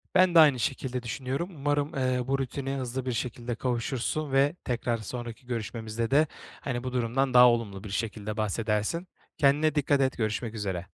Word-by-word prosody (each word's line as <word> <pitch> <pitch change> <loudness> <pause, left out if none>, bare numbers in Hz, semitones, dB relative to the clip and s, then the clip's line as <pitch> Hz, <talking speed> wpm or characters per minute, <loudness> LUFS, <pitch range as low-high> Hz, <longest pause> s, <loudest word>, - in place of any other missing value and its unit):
Ben 185 -2 +5
de - - +9
aynı 145 -5 +7
şekilde 130 0 -2
düşünüyorum, 130 +8 -3
umarım, 145 0 0
eee, 130 -2 0
bu 135 +1 +1
rutine 135 +1 -3
hızlı 130 0 -3
bir 130 - -1
şekilde 120 0 -3
kavuşursun 130 +4 -2
ve 140 +3 +3
tekrar 120 -1 -1
sonraki 120 +3 -7
görüşmemizde 115 0 -3
de, 150 +3 +5 0.3
hani, 120 -3 -3
bu 130 -1 -4
durumdan 125 +2 0
daha 125 0 +9
olumlu 105 -5 -1
bir 105 - -7
şekilde 105 +1 -3
bahsedersin. 110 - -1 0.3
Kendine 145 +2 +3
dikkat 145 -1 +2
et 130 -1 +1
görüşmek 110 0 -2
üzere. 95 -4 -3
125 Hz, 170 wpm, -28 LUFS, 115-135 Hz, 0.3 s, de